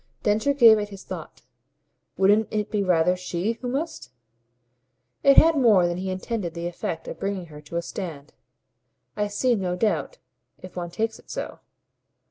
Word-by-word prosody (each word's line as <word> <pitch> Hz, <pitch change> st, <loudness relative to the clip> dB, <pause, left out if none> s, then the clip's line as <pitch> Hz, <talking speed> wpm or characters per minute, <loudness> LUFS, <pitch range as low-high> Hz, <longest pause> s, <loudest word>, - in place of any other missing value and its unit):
Densher 220 Hz, +7 st, +2 dB
gave 230 Hz, -5 st, +7 dB
it 205 Hz, 0 st, -4 dB
his 195 Hz, -1 st, -10 dB
thought. -, -, -9 dB, 0.7 s
"Wouldn't 205 Hz, +3 st, +4 dB
it 210 Hz, -1 st, -2 dB
be 210 Hz, -, +1 dB
rather 180 Hz, -1 st, +3 dB
SHE 185 Hz, +5 st, -3 dB
who 250 Hz, -, -4 dB
must?" 290 Hz, +6 st, -4 dB, 1.1 s
It 275 Hz, 0 st, +5 dB
had 330 Hz, 0 st, +7 dB
more 220 Hz, -10 st, +5 dB
than 175 Hz, 0 st, -2 dB
he 190 Hz, +1 st, -3 dB
intended 185 Hz, -2 st, -3 dB
the 170 Hz, 0 st, -4 dB
effect 170 Hz, -1 st, -4 dB
of -, -, -7 dB
bringing 195 Hz, -2 st, -3 dB
her 150 Hz, -, -10 dB
to 150 Hz, +3 st, -10 dB
a 170 Hz, -, -1 dB
stand. 155 Hz, -6 st, -7 dB, 0.8 s
"I 210 Hz, 0 st, 0 dB
see. 240 Hz, +5 st, +1 dB
No 185 Hz, -5 st, -1 dB
doubt, 220 Hz, -, -1 dB, 0.4 s
if 185 Hz, -, -12 dB
one 175 Hz, -1 st, -4 dB
takes 225 Hz, +5 st, -2 dB
it -, -, -21 dB
so." -, -, -5 dB
200 Hz, 170 wpm, -25 LUFS, 175-225 Hz, 1.1 s, gave